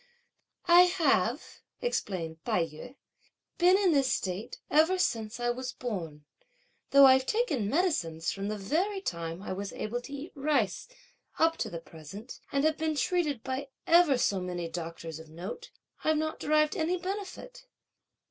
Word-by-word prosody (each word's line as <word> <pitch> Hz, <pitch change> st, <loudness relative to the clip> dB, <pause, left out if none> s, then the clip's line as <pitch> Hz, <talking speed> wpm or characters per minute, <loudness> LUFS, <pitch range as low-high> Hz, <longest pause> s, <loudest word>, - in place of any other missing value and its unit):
"I 345 Hz, 0 st, +9 dB, 0.2 s
have," 270 Hz, -, +1 dB, 0.2 s
explained 175 Hz, -, -3 dB
Tai 170 Hz, -, +1 dB
yü, 165 Hz, -, -11 dB, 0.6 s
"been 360 Hz, +2 st, +6 dB
in 390 Hz, -3 st, +3 dB
this 275 Hz, -4 st, +3 dB
state 190 Hz, +3 st, -3 dB
ever 320 Hz, +5 st, +4 dB
since 225 Hz, -9 st, -1 dB
I 240 Hz, 0 st, +1 dB
was 255 Hz, +1 st, -5 dB
born; 165 Hz, -11 st, -5 dB, 0.6 s
though 280 Hz, 0 st, +8 dB
I've 260 Hz, 0 st, +6 dB
taken 355 Hz, -, 0 dB
medicines 180 Hz, -, 0 dB
from 195 Hz, 0 st, -4 dB
the 215 Hz, 0 st, -2 dB
very 345 Hz, -, 0 dB
time 170 Hz, -, -4 dB
I 185 Hz, -, -4 dB
was 200 Hz, +1 st, -5 dB
able 240 Hz, +3 st, -3 dB
to 260 Hz, -, -11 dB
eat 280 Hz, +4 st, -7 dB
rice, 275 Hz, -, 0 dB, 0.5 s
up 325 Hz, 0 st, +3 dB
to -, -, -2 dB
the 170 Hz, -, -6 dB
present, 165 Hz, -, -11 dB
and 280 Hz, 0 st, +1 dB
have 315 Hz, 0 st, +2 dB
been 315 Hz, -1 st, 0 dB
treated 300 Hz, -6 st, 0 dB
by 265 Hz, +1 st, -3 dB, 0.2 s
ever 335 Hz, -5 st, +5 dB
so 200 Hz, -5 st, +1 dB
many 175 Hz, -2 st, -3 dB
doctors 165 Hz, -1 st, -6 dB
of 160 Hz, -1 st, -12 dB
note, 185 Hz, -, -7 dB, 0.3 s
I've 315 Hz, 0 st, +2 dB
not 315 Hz, +1 st, -2 dB
derived 305 Hz, +2 st, +2 dB
any 345 Hz, 0 st, 0 dB
benefit. 400 Hz, +7 st, -6 dB
260 Hz, 155 wpm, -29 LUFS, -, 0.6 s, I